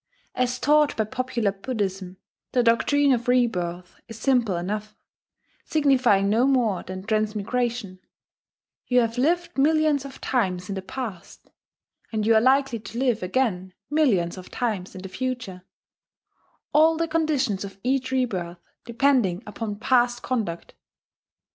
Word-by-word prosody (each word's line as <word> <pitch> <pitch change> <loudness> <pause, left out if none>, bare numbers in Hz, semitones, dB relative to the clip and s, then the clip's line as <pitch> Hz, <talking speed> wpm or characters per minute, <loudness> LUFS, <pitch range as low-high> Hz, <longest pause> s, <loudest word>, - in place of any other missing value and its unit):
As 250 0 0
taught 300 0 +3
by 220 - +2
popular 240 -2 -1
Buddhism, 195 -3 -4 0.4
the 250 -2 +3
doctrine 280 +5 +3
of 240 -2 0
rebirth 180 -8 0
is 225 -2 -9
simple 240 -8 +2
enough, 210 +4 -4 0.7
signifying 255 -10 +3
no 225 +6 +3
more 240 -8 +2
than 185 0 -7
transmigration: 215 0 -2 0.9
you 250 0 +4
have 230 +1 -2
lived 340 +2 0
millions 305 -1 +3
of 275 -1 -10
times 190 -6 -1
in - - -2
the 190 - -4
past, 205 -3 -8 0.6
and 215 -2 -1
you 225 - +5
are 220 - +5
likely 265 -1 +3
to 225 +2 -9
live 245 -3 +1
again 185 -2 -1 0.2
millions 200 - +2
of 185 - -12
times 210 -7 -3
in 185 - -8
the - - -5
future, 245 -3 -4 1.1
all 315 +2 +5
the 330 0 0
conditions 295 -11 0
of 195 -1 -9
each 260 +1 0
rebirth 190 -10 -2 0.3
depending 235 -5 +1
upon 210 0 -5
past 240 +2 +1
conduct. 215 -10 -3
235 Hz, 135 wpm, -24 LUFS, 195-260 Hz, 1.1 s, you